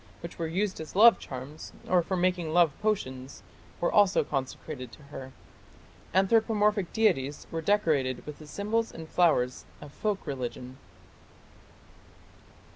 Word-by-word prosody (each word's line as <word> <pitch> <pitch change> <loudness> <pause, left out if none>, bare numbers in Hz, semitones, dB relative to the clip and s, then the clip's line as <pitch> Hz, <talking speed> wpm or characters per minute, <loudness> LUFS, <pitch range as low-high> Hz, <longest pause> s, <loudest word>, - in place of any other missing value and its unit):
which 170 0 -9
were 165 - -1
used 185 +2 -1
as 160 - -9
love 225 +4 +7
charms, 135 +4 -8
or 180 -1 +4
for 185 +2 -2
making 180 -2 0
love 170 -3 +4
potions, 130 -12 -3 0.4
were 175 - +1
also 205 -2 +4
consecrated 135 -2 -5
to 150 - -15
her. 135 -2 -9 0.8
Anthropomorphic 210 0 +2
deities 155 -11 +1
were 165 - -3
decorated 155 -10 +1
with 150 -1 -8
the 155 - -12
symbols 215 +7 -1
and 160 -1 -9
flowers 150 -8 +2 0.2
of 145 -1 -12
folk 210 -2 -2
religion. 130 -2 -5
165 Hz, 130 wpm, -28 LUFS, 140-200 Hz, 0.8 s, love